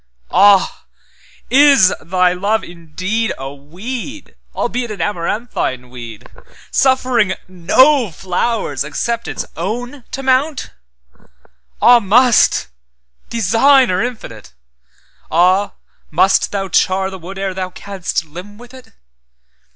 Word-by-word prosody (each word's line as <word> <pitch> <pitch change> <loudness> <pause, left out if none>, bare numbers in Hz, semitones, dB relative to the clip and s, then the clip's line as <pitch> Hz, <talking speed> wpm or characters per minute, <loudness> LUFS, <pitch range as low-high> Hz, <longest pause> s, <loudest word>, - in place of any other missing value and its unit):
Ah! 195 +1 +4 0.7
is 275 -8 +6
Thy 180 +2 +2
love 205 +4 -1
indeedA 175 0 -4
weed, 225 - -8 0.2
albeit 240 0 -2
an 210 - -7
amaranthine 170 - -3
weed, 120 -4 -10 0.4
Suffering 255 -7 +2
no 240 - +3
flowers 180 - -2
except 230 +11 -3
its - - -4
own 245 - -5
to 270 - -6
mount? 265 +2 0 1.1
Ah! 245 0 +7
must—Designer 190 - +2
infinite!—Ah! 115 - -3 0.4
must 185 +5 +2
Thou 195 -1 -2
char 190 +1 +1
the 190 - -8
wood 185 +3 -9
ere 195 -1 -3
Thou 185 0 -4
canst 185 -3 -4
limn 180 +7 -11
with 245 +2 -15
it? 260 -1 -15
195 Hz, 95 wpm, -16 LUFS, 170-240 Hz, 1.1 s, Ah